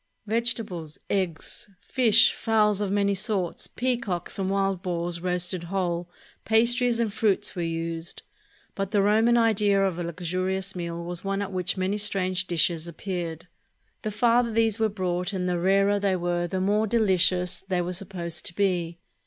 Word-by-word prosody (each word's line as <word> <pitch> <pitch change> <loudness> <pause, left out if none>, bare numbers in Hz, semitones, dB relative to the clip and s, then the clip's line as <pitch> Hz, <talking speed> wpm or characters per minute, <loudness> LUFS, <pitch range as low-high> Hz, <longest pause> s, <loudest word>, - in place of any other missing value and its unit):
Vegetables, 215 -8 -2
eggs, 185 -1 -2
fish, 230 0 +4
fowls 210 -2 +2
of 200 -2 -1
many 200 0 +2
sorts, 195 -3 -1
peacocks, 230 -9 -2
and 190 -1 0
wild 195 -2 0
boars 175 -2 -2
roasted 180 0 -1
whole, 175 -1 -2 0.3
pastries 235 +2 +3
and 225 -3 0
fruits 210 -3 +1
were 175 - -3
used; 165 0 -3 0.5
but 195 -2 -3
the 205 0 +2
Roman 220 +4 +4
idea 210 -3 +3
of 180 -3 -2
a - - -2
luxurious 185 +3 -2
meal 170 -1 -4
was 175 0 -5
one 195 0 -1
at 195 - -6
which 185 0 -1
many 190 +3 0
strange 185 -3 0
dishes 170 -1 +1
appeared. 170 -1 -5 0.5
The 215 - -2
farther 235 +2 +2
these 225 -1 +1
were 220 -1 +2
brought 180 -1 -2
and 180 -1 -1
the 175 -1 0
rarer 195 +3 +3
they 195 -2 +1
were, 175 -1 -1
the 185 +2 -2
more 210 +3 +2
delicious 185 -4 +2
they 190 -2 -2
were 180 +1 -3
supposed 170 -3 -3
to 170 - -8
be. 175 -4 0
190 Hz, 160 wpm, -26 LUFS, 175-210 Hz, 0.5 s, fish